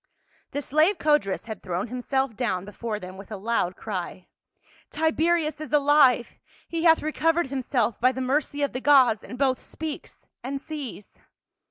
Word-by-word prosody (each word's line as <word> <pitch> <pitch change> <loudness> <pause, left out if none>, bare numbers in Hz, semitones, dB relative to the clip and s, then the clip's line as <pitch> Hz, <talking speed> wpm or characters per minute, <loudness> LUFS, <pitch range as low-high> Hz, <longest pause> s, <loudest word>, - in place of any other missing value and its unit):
The 285 - -4
slave 310 +9 +3
Codrus 295 -12 +1
had 220 -4 -7
thrown 185 +4 -3
himself 255 0 -1
down 195 -7 -1
before 210 +1 -5
them, 185 0 -9
with 195 +2 -12
a 210 - -4
loud 195 -3 -1
cry. 185 -3 -6 0.3
" - - -31
Tiberius 320 0 +1
is 310 - -7
alive! 285 -4 +4 0.3
he 330 0 -2
hath 325 -1 +5
recovered 320 -1 +1
himself 245 -4 -1
by 255 +1 +5
the 260 - -6
mercy 285 +2 0
of 285 - -1
the 255 - -4
gods, 260 -7 +5
and 250 - -8
both 260 -1 +1
speaks 315 -2 -8 0.2
and 275 +2 -3
sees." 280 -9 -8
265 Hz, 165 wpm, -25 LUFS, 220-300 Hz, 0.3 s, hath